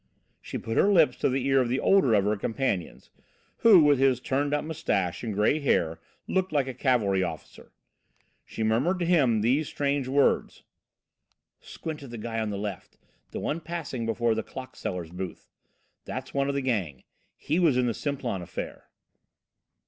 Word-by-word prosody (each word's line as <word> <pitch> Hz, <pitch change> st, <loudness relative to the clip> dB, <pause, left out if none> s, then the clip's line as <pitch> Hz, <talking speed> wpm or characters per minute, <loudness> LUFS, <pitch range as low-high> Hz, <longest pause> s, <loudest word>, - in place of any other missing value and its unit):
She -, -, -5 dB
put 115 Hz, -, -4 dB
her 205 Hz, -, +4 dB
lips 160 Hz, -9 st, +4 dB
to -, -, +1 dB
the 130 Hz, 0 st, -1 dB
ear 135 Hz, -1 st, +4 dB
of 120 Hz, -, -1 dB
the 130 Hz, +2 st, 0 dB
older 165 Hz, -, +4 dB
of 100 Hz, -, +3 dB
her 105 Hz, +1 st, +2 dB
companions, 110 Hz, -, -3 dB, 0.5 s
who, 200 Hz, -8 st, +7 dB
with 145 Hz, -2 st, +4 dB
his 135 Hz, -2 st, +3 dB
turned 140 Hz, +3 st, -1 dB
up 150 Hz, +1 st, 0 dB
moustache 100 Hz, -, -2 dB
and 115 Hz, -, -2 dB
grey 105 Hz, +9 st, +2 dB
hair, 85 Hz, -, +1 dB, 0.3 s
looked 190 Hz, 0 st, 0 dB
like 145 Hz, -3 st, +1 dB
a 130 Hz, -, -5 dB
cavalry 115 Hz, -7 st, +1 dB
officer. 80 Hz, -5 st, -6 dB, 0.7 s
She 110 Hz, -, -5 dB
murmured 120 Hz, +12 st, +1 dB
to 175 Hz, -, -1 dB
him 135 Hz, -11 st, +3 dB
these 135 Hz, +7 st, +2 dB
strange 140 Hz, -2 st, -1 dB
words: 140 Hz, +1 st, +1 dB, 1.0 s
"Squint 160 Hz, -2 st, -7 dB
at 140 Hz, -, -10 dB
the 120 Hz, -, -7 dB
guy 115 Hz, +1 st, -4 dB
on 110 Hz, -1 st, -1 dB
the 100 Hz, -, -3 dB
left, 100 Hz, -2 st, -6 dB, 0.3 s
the -, -, -5 dB
one 155 Hz, -, -2 dB
passing 155 Hz, -8 st, -4 dB
before 115 Hz, 0 st, +1 dB
the 110 Hz, -, -1 dB
clock 130 Hz, +3 st, -9 dB
seller's 90 Hz, -3 st, -5 dB
booth. 90 Hz, +1 st, -7 dB, 0.6 s
That's -, -, -6 dB
one 140 Hz, 0 st, 0 dB
of 140 Hz, -, -1 dB
the 140 Hz, -, 0 dB
gang. 100 Hz, -, -2 dB, 0.3 s
He 155 Hz, +4 st, -1 dB
was 160 Hz, -8 st, +3 dB
in 125 Hz, -, +2 dB
the 120 Hz, -, 0 dB
Simplon 130 Hz, -7 st, -3 dB
affair." 85 Hz, -, -7 dB
130 Hz, 180 wpm, -27 LUFS, 110-145 Hz, 1.0 s, who